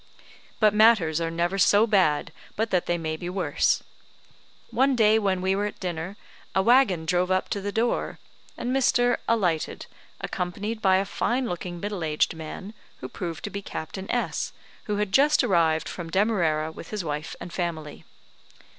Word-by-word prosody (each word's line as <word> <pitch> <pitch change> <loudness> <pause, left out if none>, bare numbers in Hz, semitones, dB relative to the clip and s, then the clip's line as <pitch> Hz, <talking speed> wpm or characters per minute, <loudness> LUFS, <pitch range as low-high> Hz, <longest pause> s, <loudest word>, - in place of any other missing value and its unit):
But 215 -2 +4
matters 210 -8 +4
are 165 - -1
never 170 +4 -1
so 205 +3 +5
bad 185 -9 +2 0.2
but 220 +1 -1
that 180 -2 +1
they 175 - +1
may 160 -1 -3
be 175 +2 -6
worse. 180 -6 +1 0.9
One 265 +1 +3
day 220 -1 +4
when 190 -3 0
we 190 +1 +1
were 205 +1 0
at 210 - -9
dinner, 180 +2 -4 0.4
a 190 - +3
waggon 230 -8 +4
drove 180 +1 +1
up 185 0 0
to 200 - -2
the 205 +1 -3
door, 230 +3 -1 0.4
and 250 +2 -2
Mr. 245 -2 +3
alighted, 180 -9 0 0.3
accompanied 205 +5 -4
by 190 -2 +4
a 195 +1 +2
fine 250 +5 -1
looking, 175 -3 -5
middle 200 -2 -4
aged 150 -1 +1
man, 160 +6 -8 0.3
who 130 - -5
proved 165 +3 -6
to 205 - -4
be 200 - -5
Captain 190 +1 -7
S, 245 - -1 0.3
who 210 - -1
had 205 -1 -1
just 285 +7 +4
arrived 165 -7 +2
from 170 -2 -6
Demarara 170 -6 +1
with - - -11
his 210 -3 -3
wife 150 0 -4
and 170 - -8
family. 160 -4 -4
190 Hz, 170 wpm, -25 LUFS, 165-215 Hz, 0.9 s, so